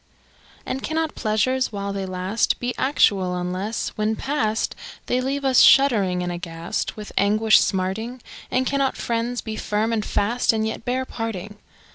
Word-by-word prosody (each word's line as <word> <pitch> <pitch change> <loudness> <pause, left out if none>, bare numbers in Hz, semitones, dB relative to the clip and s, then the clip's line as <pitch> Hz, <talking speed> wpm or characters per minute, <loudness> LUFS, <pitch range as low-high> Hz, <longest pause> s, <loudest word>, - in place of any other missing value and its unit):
] - - -28
And 265 - -3
cannot 320 +1 -1
pleasures, 240 +4 0
while 200 -1 -4
they 195 -1 -3
last, 185 +4 0
Be 245 0 -2
actual 195 -9 +2
unless, 185 +5 -2
when 215 +1 -1
past, 225 -5 -1 0.3
They 250 - 0
leave 275 +2 -2
us 260 -2 +5
shuddering 205 -10 +5
and 175 - -2
aghast, 170 +1 -4
With 210 -1 -8
anguish 215 +2 +5
smarting? 210 +6 -1 0.3
And 255 +1 +1
cannot 275 0 0
friends 235 +1 -2
be 220 -1 -5
firm 215 +2 -1
and 215 -2 0
fast, 230 +5 +1
And 220 0 0
yet 220 +1 -4
bear 255 +1 -1
parting? 210 -4 -5
220 Hz, 160 wpm, -23 LUFS, 195-250 Hz, 0.3 s, us